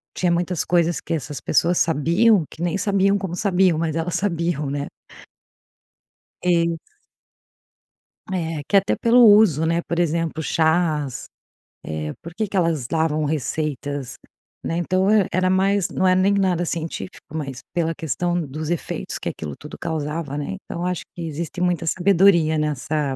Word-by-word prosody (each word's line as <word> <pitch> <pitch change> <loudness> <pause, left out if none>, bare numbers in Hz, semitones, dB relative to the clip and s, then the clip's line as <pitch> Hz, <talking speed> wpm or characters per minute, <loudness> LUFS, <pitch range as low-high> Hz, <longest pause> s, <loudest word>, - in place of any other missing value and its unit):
tinha 180 -1 +1
muitas 175 0 0
coisas 170 -1 +1
que - - -9
essas 150 -2 -4
pessoas 170 +4 +2
sabiam, 170 +6 +3
que 160 - -11
nem 175 +1 0
sabiam 200 0 +2
como 190 -3 -4
sabiam, 180 -4 +2
mas 160 -2 -1
elas 165 +1 -2
sabiam, 170 -6 -1
né? 140 +1 -3 1.5
Isso. 170 -2 +2 1.5
É, 165 -5 -2
que 200 - +5
até 195 +1 +2
pelo 235 +1 +4
uso, 205 -8 +6
né? 165 +1 +1
Por 170 0 -3
exemplo, 165 -1 0
chás. 160 -5 0 0.6
Eh, 75 -1 -4
por 170 - -9
que 215 +4 -2
que 200 - -8
elas 165 -8 +1
davam 155 0 0
receitas, 145 -2 -3 0.5
né. 165 - -2
Então 185 +2 +1 0.3
era 185 +1 +1
mais 195 0 +2
não 190 - +1
é 185 - +4
nem 190 +2 +3
nada 185 -3 +1
científico, 160 - -5
mas 135 -5 -4 0.2
pela 165 -1 +1
questão 175 +3 -1
dos 155 +1 -5
efeitos 175 - -3
que - - -3
aquilo 75 -2 -6
tudo 150 - -10
causava, 155 -2 -3
né. 150 +7 -4
Então 170 - -6
eu - - -1
acho 180 -2 -2
que 175 - -7
existe 165 +3 -5
muita 175 -2 0
sabedoria 175 -2 +4
nessa, 150 -1 -1
170 Hz, 155 wpm, -22 LUFS, 155-180 Hz, 1.5 s, uso